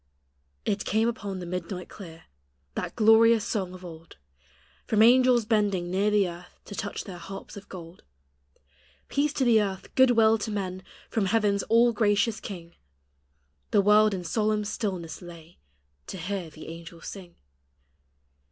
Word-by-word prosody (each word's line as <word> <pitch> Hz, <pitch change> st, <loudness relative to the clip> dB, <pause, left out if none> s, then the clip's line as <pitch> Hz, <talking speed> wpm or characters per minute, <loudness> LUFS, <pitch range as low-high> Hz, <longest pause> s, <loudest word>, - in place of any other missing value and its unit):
It 200 Hz, -1 st, -1 dB
came 220 Hz, +2 st, +1 dB
upon 205 Hz, -4 st, -4 dB
the 180 Hz, -, -6 dB
midnight 180 Hz, +1 st, -5 dB
clear, 165 Hz, -5 st, -11 dB, 0.5 s
That -, -, -4 dB
glorious 225 Hz, 0 st, +5 dB
song 190 Hz, -5 st, -3 dB
of 185 Hz, 0 st, -11 dB
old, 165 Hz, -, -12 dB, 0.7 s
From 215 Hz, 0 st, +4 dB
angels 250 Hz, -1 st, +5 dB
bending 205 Hz, -5 st, 0 dB
near 195 Hz, +3 st, +2 dB
the 205 Hz, -2 st, +3 dB
earth 175 Hz, +1 st, -11 dB
To -, -, -9 dB
touch 205 Hz, 0 st, -4 dB
their 180 Hz, -3 st, -9 dB
harps 195 Hz, +3 st, -9 dB
of 200 Hz, 0 st, -11 dB
gold: 170 Hz, -1 st, -10 dB, 0.6 s
" 65 Hz, 0 st, -35 dB
Peace 290 Hz, +1 st, +1 dB
to 265 Hz, -, 0 dB
the 225 Hz, -3 st, +5 dB
earth, 195 Hz, -2 st, -5 dB
good 260 Hz, 0 st, +5 dB
will 225 Hz, -2 st, +4 dB
to 220 Hz, -, -4 dB
men 190 Hz, -3 st, -4 dB, 0.3 s
From 215 Hz, -3 st, +1 dB
heaven's 205 Hz, -1 st, +2 dB
all 235 Hz, +1 st, +5 dB
gracious 210 Hz, 0 st, +1 dB
King!" 170 Hz, -4 st, -9 dB, 1.0 s
The 205 Hz, -, +4 dB
world 210 Hz, 0 st, +5 dB
in 180 Hz, -, -5 dB
solemn 210 Hz, +4 st, 0 dB
stillness 185 Hz, -7 st, -4 dB
lay 170 Hz, -1 st, -13 dB, 0.5 s
To -, -, -6 dB
hear 180 Hz, -1 st, -4 dB
the 155 Hz, +1 st, -11 dB
angels 165 Hz, 0 st, -10 dB
sing. 180 Hz, -4 st, -9 dB
200 Hz, 155 wpm, -27 LUFS, 175-220 Hz, 1.0 s, glorious